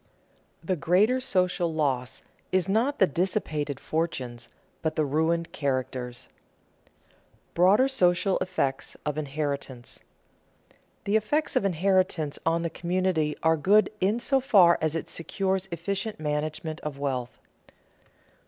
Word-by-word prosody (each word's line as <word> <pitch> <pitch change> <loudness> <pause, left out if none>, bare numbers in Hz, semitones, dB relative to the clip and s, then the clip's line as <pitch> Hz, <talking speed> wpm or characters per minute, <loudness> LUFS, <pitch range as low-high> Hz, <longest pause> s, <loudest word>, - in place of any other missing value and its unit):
The 185 +3 0
greater 200 - +3
social 180 -8 0
loss 135 -5 -1 0.3
is 185 -1 +2
not 230 +9 +1
the 190 - +6
dissipated 155 -4 -2
fortunes, 125 -8 -3 0.3
but 160 -1 -1
the 155 - +1
ruined 160 +4 0
characters. 130 -3 -3
[Sidenote: - - -27
Broader 195 +9 +5
social 185 -6 +2
effects 180 -8 -2
of 150 0 -1
inheritance] 140 -4 -4 1.0
The 205 +2 +2
effects 295 +9 -1
of - - +2
inheritance 185 -4 +1
on 165 +1 +2
the 170 - -2
community 175 -4 0
are 160 0 +4
good 200 +7 +3
in 205 +5 +2
so 270 +2 +2
far 195 -10 +5
as 160 0 0
it 165 - -3
secures 190 +2 -2
efficient 195 +5 -3
management 155 +1 -3
of 150 -2 -5
wealth. 130 -3 -3
170 Hz, 125 wpm, -27 LUFS, 150-190 Hz, 1.0 s, the